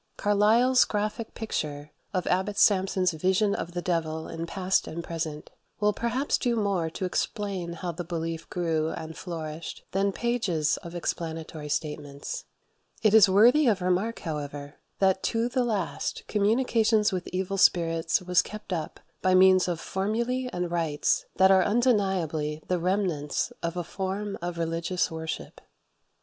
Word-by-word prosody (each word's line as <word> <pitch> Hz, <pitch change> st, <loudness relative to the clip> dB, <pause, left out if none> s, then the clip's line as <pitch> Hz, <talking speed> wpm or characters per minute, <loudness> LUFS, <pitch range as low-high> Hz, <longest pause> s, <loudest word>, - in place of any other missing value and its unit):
Carlyle's 225 Hz, +5 st, +4 dB
graphic 215 Hz, +2 st, -3 dB
picture 150 Hz, -9 st, -4 dB, 0.2 s
of 185 Hz, -2 st, -1 dB
Abbot 190 Hz, +3 st, 0 dB
Sampson's 190 Hz, -2 st, +3 dB
vision 190 Hz, +5 st, +1 dB
of 170 Hz, -2 st, -4 dB
the 175 Hz, 0 st, -3 dB
devil 160 Hz, -2 st, -1 dB
in 165 Hz, 0 st, -5 dB
"Past 190 Hz, +2 st, 0 dB
and 170 Hz, +1 st, -5 dB
Present" 160 Hz, -3 st, -5 dB, 0.3 s
will 210 Hz, 0 st, +3 dB
perhaps 240 Hz, +6 st, 0 dB
do 240 Hz, -2 st, +1 dB
more 200 Hz, -7 st, 0 dB
to 175 Hz, +3 st, -4 dB
explain 185 Hz, -2 st, -2 dB
how 175 Hz, +1 st, -4 dB
the 175 Hz, +2 st, -5 dB
belief 165 Hz, -1 st, -4 dB
grew 160 Hz, -3 st, 0 dB
and 160 Hz, 0 st, -6 dB
flourished 165 Hz, -3 st, -6 dB
than 195 Hz, +1 st, +1 dB
pages 195 Hz, -10 st, 0 dB
of 170 Hz, 0 st, -9 dB
explanatory 160 Hz, -3 st, -4 dB
statements. 150 Hz, -, -4 dB, 0.6 s
It 215 Hz, -2 st, +4 dB
is 215 Hz, -3 st, +8 dB
worthy 240 Hz, +9 st, +6 dB
of 210 Hz, -5 st, +3 dB
remark, 185 Hz, +5 st, 0 dB
however, 145 Hz, -2 st, -5 dB, 0.2 s
that 190 Hz, -1 st, +2 dB
to 230 Hz, +1 st, +1 dB
the 250 Hz, +1 st, 0 dB
last, 210 Hz, -7 st, -2 dB
communication 220 Hz, +1 st, +2 dB
with 185 Hz, -2 st, -3 dB
evil 190 Hz, +1 st, -2 dB
spirits 165 Hz, -1 st, +3 dB
was 180 Hz, -1 st, +4 dB
kept 210 Hz, -2 st, -7 dB
up 160 Hz, -3 st, -4 dB, 0.2 s
by 185 Hz, 0 st, +3 dB
means 185 Hz, 0 st, +6 dB
of 175 Hz, -2 st, -2 dB
formulae 235 Hz, +8 st, -1 dB
and 180 Hz, -1 st, -3 dB
rites 165 Hz, -4 st, 0 dB
that 190 Hz, +2 st, +5 dB
are 190 Hz, -1 st, +6 dB
undeniably 190 Hz, -, +1 dB
the 180 Hz, -1 st, 0 dB
remnants 175 Hz, -5 st, -1 dB
of 170 Hz, +1 st, -3 dB
a 175 Hz, -, -1 dB
form 195 Hz, +3 st, -3 dB
of 175 Hz, 0 st, -4 dB
religious 165 Hz, +2 st, -1 dB
worship. 160 Hz, -1 st, -6 dB
185 Hz, 150 wpm, -27 LUFS, 165-205 Hz, 0.6 s, is